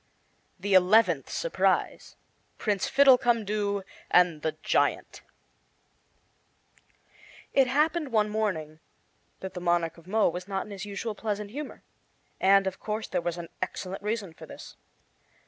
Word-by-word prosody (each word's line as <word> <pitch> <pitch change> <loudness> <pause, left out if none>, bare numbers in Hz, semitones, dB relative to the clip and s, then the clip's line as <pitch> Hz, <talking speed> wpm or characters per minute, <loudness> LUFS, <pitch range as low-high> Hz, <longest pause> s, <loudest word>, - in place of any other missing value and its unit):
The 200 +2 -1
Eleventh 185 -4 +4
Surprise - - 0 0.4
PRINCE 205 -3 0
FIDDLECUMDOO 220 -7 +3 0.3
AND 175 -4 +4
THE 160 0 -1
GIANT - - 0 2.3
It 270 -2 +4
happened, 300 +2 +1
one 215 -2 +3
morning, 185 -8 -2 0.6
that 190 0 -6
the 180 - -6
Monarch 170 -1 0
of 170 - -20
Mo 215 +2 +3
was 180 +2 -6
not 195 -1 -2
in 210 - -12
his 195 0 -6
usual 210 +2 -4
pleasant 210 -1 -4
humor; 290 +4 -7 0.6
and, 195 +1 +5
of 190 -1 -3
course, 215 +1 -4
there - - -1
was 175 0 -3
an 170 -1 -7
excellent 185 +1 -4
reason 210 -4 -3
for - - -12
this. - - -11
200 Hz, 130 wpm, -28 LUFS, 180-220 Hz, 2.3 s, and